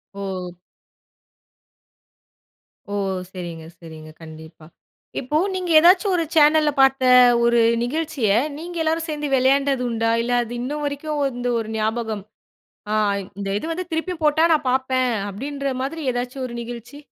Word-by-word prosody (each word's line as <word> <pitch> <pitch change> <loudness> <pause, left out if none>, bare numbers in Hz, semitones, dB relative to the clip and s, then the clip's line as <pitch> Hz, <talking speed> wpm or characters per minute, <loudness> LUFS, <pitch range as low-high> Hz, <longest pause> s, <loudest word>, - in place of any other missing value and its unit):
ஓ! 185 -3 -6 2.4
ஓ! - - -1 0.4
சரிங்க, 175 -3 -7 0.2
சரிங்க. 160 -2 -11
கண்டிப்பா. 160 0 -12 0.5
இப்போ 275 +4 -1 0.2
நீங்க 365 -1 -3
ஏதாச்சும் 365 +4 +4
ஒரு 335 - +1
சேனல்ல 305 0 +5
பார்த்த 270 0 +3 0.4
ஒரு 235 0 +3 0.2
நிகழ்ச்சிய 285 -3 -1 0.3
நீங்க 345 +2 -7
எல்லோரும் 320 +1 0
சேர்ந்து 300 -1 -3
விளையாண்டது 270 0 +2
உண்டா? 225 -1 0
இல்ல, 240 +1 -3
அது 235 0 -8
இன்னும் 295 +4 -4
வரைக்கும் 290 +1 -3
வந்து 245 -2 -3
ஒரு 220 -1 -5
ஞாபகம். 220 -1 -2 0.7
அ - - +1 0.4
இந்த 200 -1 -4
இது - - -6
வந்து 365 +3 -4
திருப்பியும் 325 +1 -3
போட்டா 305 +2 +3
நான் 305 -3 +1
பார்ப்பேன், 260 -1 +1 0.2
அப்பிடின்ற 275 +7 -4
மாதிரி 320 +4 -4
ஏதாச்சும் 245 +2 -4
ஒரு 240 - -9
நிகழ்ச்சி. 240 +3 -9
260 Hz, 135 wpm, -22 LUFS, 225-300 Hz, 2.4 s, சேனல்ல